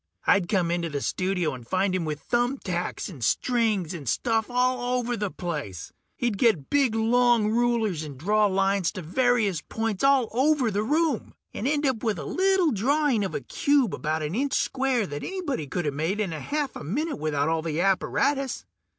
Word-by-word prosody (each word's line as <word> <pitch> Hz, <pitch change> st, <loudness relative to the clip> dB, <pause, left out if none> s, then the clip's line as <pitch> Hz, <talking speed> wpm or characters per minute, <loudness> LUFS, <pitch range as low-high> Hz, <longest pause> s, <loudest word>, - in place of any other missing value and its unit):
I'd 195 Hz, -4 st, +3 dB
come 180 Hz, -5 st, +1 dB
into 170 Hz, -1 st, -1 dB
the 145 Hz, -2 st, -3 dB
studio 180 Hz, 0 st, -1 dB
and 125 Hz, -2 st, -9 dB
find 185 Hz, +3 st, +1 dB
him 180 Hz, -3 st, -1 dB
with 150 Hz, -2 st, -4 dB
thumb 245 Hz, -, 0 dB
tacks 180 Hz, -6 st, -3 dB
and 150 Hz, -, -8 dB
strings 215 Hz, -, +1 dB
and 145 Hz, -8 st, -5 dB
stuff 225 Hz, -, 0 dB
all 250 Hz, 0 st, +1 dB
over 245 Hz, 0 st, -1 dB
the 205 Hz, -2 st, -2 dB
place. 150 Hz, -, -5 dB, 0.2 s
He'd 230 Hz, -5 st, -1 dB
get 215 Hz, -, +2 dB
big 270 Hz, -6 st, +3 dB
long 230 Hz, -1 st, +3 dB
rulers 230 Hz, -7 st, +1 dB
and 145 Hz, -3 st, -8 dB
draw 210 Hz, +8 st, +2 dB
lines 195 Hz, -2 st, +1 dB
to 185 Hz, -4 st, -6 dB
various 215 Hz, -1 st, +1 dB
points 225 Hz, -2 st, -3 dB
all 275 Hz, -3 st, +4 dB
over 265 Hz, -1 st, +2 dB
the 205 Hz, +1 st, 0 dB
room, 295 Hz, +2 st, 0 dB, 0.2 s
and 230 Hz, -, -3 dB
end 295 Hz, +1 st, +1 dB
up 260 Hz, -5 st, 0 dB
with 220 Hz, -5 st, 0 dB
a 145 Hz, -, -6 dB
little 375 Hz, -, +2 dB
drawing 265 Hz, +1 st, +1 dB
of 190 Hz, -, -3 dB
a -, -, -2 dB
cube 280 Hz, -7 st, +1 dB
about 155 Hz, 0 st, -2 dB
an 150 Hz, +2 st, -3 dB
inch 270 Hz, +5 st, -1 dB
square 260 Hz, -4 st, +1 dB
that 145 Hz, -4 st, -6 dB
anybody 300 Hz, -, -3 dB
coulda 155 Hz, 0 st, -2 dB
made 160 Hz, +9 st, -2 dB
in 195 Hz, -6 st, -1 dB
a 155 Hz, -, -5 dB
half 290 Hz, -, -2 dB
a -, -, -7 dB
minute 290 Hz, -, -2 dB
without 150 Hz, -1 st, 0 dB
all 165 Hz, 0 st, +1 dB
the 160 Hz, -1 st, -3 dB
apparatus. 255 Hz, +8 st, 0 dB
215 Hz, 195 wpm, -26 LUFS, 170-250 Hz, 0.2 s, all